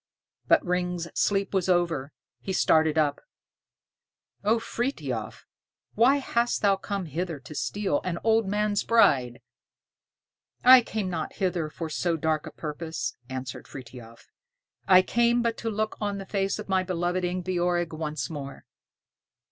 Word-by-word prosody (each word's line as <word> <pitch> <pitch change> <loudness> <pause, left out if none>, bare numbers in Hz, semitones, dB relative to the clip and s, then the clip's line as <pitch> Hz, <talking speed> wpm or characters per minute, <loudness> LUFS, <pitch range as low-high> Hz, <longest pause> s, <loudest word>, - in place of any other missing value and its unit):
But - - +4
Ring's 180 -1 -1
sleep 200 -1 0
was 190 -1 +1
over. 170 -6 +1 0.3
He 190 - -4
started 160 -3 +3
up. 150 -2 +1 1.2
"O 215 +3 +3
Frithiof 150 - -4 0.5
why 245 +6 +5
hast 240 -5 0
thou 200 -1 +5
come 195 0 -4
hither 165 0 -4
to 155 - -10
steal 195 0 -1
an 175 -2 -2
old 225 -1 +3
man's 205 0 0
bride?" 130 - +3 1.2
"I 255 0 +9
came 215 -4 -3
not 160 -3 -3
hither 180 -5 -1
for 165 +1 -5
so 165 +2 -1
dark 155 -1 -1
a - - -7
purpose," 160 +1 -5
answered 130 -1 -6
Frithiof; 120 -3 -12 0.6
"I 185 0 +7
came 235 +3 +2
but 230 -1 0
to 230 - -3
look 215 0 -2
on 205 -1 -1
the 195 - -6
face 195 0 -1
of - - -7
my 190 -1 +2
loved 180 0 -1
Ingebjorg 175 -1 -1
once 155 -1 -3
more." 145 -5 -8
180 Hz, 140 wpm, -27 LUFS, 155-205 Hz, 1.2 s, I